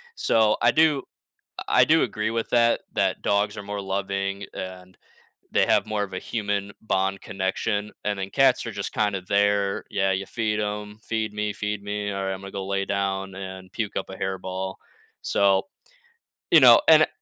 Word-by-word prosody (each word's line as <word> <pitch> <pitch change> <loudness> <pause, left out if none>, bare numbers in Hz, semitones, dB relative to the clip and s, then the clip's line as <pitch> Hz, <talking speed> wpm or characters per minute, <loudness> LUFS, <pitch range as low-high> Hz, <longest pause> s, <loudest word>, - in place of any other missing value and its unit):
So, 110 -1 +3
I - - +5
do 155 -3 +3 0.6
I - - +3
I - - +9
do 160 +1 +4
agree 110 -1 -2
with 115 -1 -2
that, 115 -1 +3
that - - 0
dogs 100 +1 +1
are 100 - -6
more 100 0 -5
loving, 100 0 -2
and 95 0 -8 0.5
they - - +3
have - - +3
more 105 -1 -1
of 100 - -6
a 90 - -3
human 100 -3 -3
bond 95 -2 0
connection, 100 +1 -2 0.2
and 100 -1 -1
then 95 0 -4
cats 135 -1 +3
are 115 - -4
just 100 -1 -4
kind 105 -2 +1
of 90 -1 -6
there. 100 -1 +2
Yeah, 95 -1 +1
you 95 +1 -1
feed 105 -1 -1
'em. 105 0 -4
"Feed 110 -2 -2
me, 105 0 -2
feed 105 0 -3
me, 105 0 -3
alright, 95 0 -2
I'm 95 - -7
gonna 100 - -9
go 95 -1 -5
lay 100 0 -1
down 95 -1 -2
and 95 -1 -8
puke 110 -2 -4
up 95 - -4
a 95 - -7
hairball." 95 0 -4 0.5
So, 95 -1 +2 0.8
you - - +9
know - - +9
and - - +7
100 Hz, 190 wpm, -25 LUFS, 95-105 Hz, 0.8 s, I